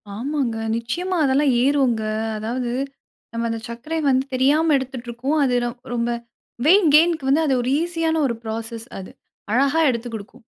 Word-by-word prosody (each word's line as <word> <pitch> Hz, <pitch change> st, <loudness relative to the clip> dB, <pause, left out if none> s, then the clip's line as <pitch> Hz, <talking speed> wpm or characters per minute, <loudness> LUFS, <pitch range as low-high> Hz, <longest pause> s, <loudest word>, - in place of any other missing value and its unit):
ஆமாங்க. 255 Hz, 0 st, -2 dB, 0.2 s
நிச்சியமா 345 Hz, +12 st, -2 dB
அதெல்லாம் 275 Hz, +1 st, +3 dB
ஏறுங்க. 265 Hz, -5 st, +2 dB, 0.3 s
அதாவது, 235 Hz, +3 st, -3 dB, 0.6 s
நம்ம 230 Hz, 0 st, -1 dB
அந்த 225 Hz, 0 st, -3 dB
சர்க்கரைய 260 Hz, +8 st, -4 dB
வந்து 260 Hz, 0 st, +2 dB
தெரியாம 295 Hz, +5 st, +3 dB
எடுத்துட்ருக்கோம். 260 Hz, +2 st, -3 dB
அது 255 Hz, -2 st, +2 dB
ரொ -, -, -1 dB, 0.2 s
ரொம்ப 235 Hz, 0 st, 0 dB, 0.6 s
வெய்ட் 375 Hz, +1 st, +6 dB
கெய்ன்‌க்கு 320 Hz, -3 st, +3 dB
வந்து, 300 Hz, +4 st, +3 dB
அது 270 Hz, -, +2 dB
ஒரு 250 Hz, +2 st, -1 dB
ஈசியான 330 Hz, -2 st, 0 dB
ஒரு 235 Hz, -, -2 dB
புரோசஸ் 225 Hz, +1 st, -5 dB
அது. 185 Hz, -, -9 dB, 0.4 s
அழகா 275 Hz, +7 st, +3 dB
எடுத்து 235 Hz, -1 st, -2 dB
குடுக்கும். 220 Hz, +4 st, -10 dB
260 Hz, 150 wpm, -22 LUFS, 235-300 Hz, 0.6 s, வெய்ட்